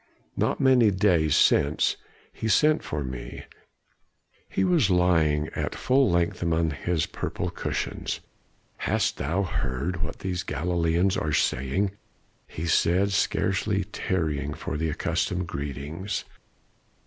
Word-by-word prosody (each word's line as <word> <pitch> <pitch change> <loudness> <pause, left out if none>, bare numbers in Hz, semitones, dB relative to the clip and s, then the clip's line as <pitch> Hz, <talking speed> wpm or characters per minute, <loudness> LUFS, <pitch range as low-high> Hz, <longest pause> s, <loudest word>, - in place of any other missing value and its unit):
Not - - 0
many 130 -4 +5
days 90 -6 +3
since 75 +1 +3 0.4
he 110 - -4
sent 150 +9 +4
for 75 -1 -4
me. 65 -2 -7 1.1
He 95 - 0
was 155 - +3
lying 80 -5 +3
at - - -3
full 135 +1 +3
length 85 -1 0
among 85 -2 +1
his 80 +1 -1
purple - - -4
cushions. - - -3 0.6
"'Hast - - 0
thou 85 +9 0
heard 80 +1 -2
what - - -3
these 90 -1 -3
Galileans 85 +3 0
are 75 -1 -1
saying,' 70 +8 +1 0.6
he 80 - -5
said, 90 +4 +2
scarcely 95 +1 +1
tarrying 80 -6 -2
for - - -5
the 80 +1 -1
accustomed 90 +4 -1
greetings. 75 +6 -4
85 Hz, 120 wpm, -26 LUFS, 75-95 Hz, 1.1 s, many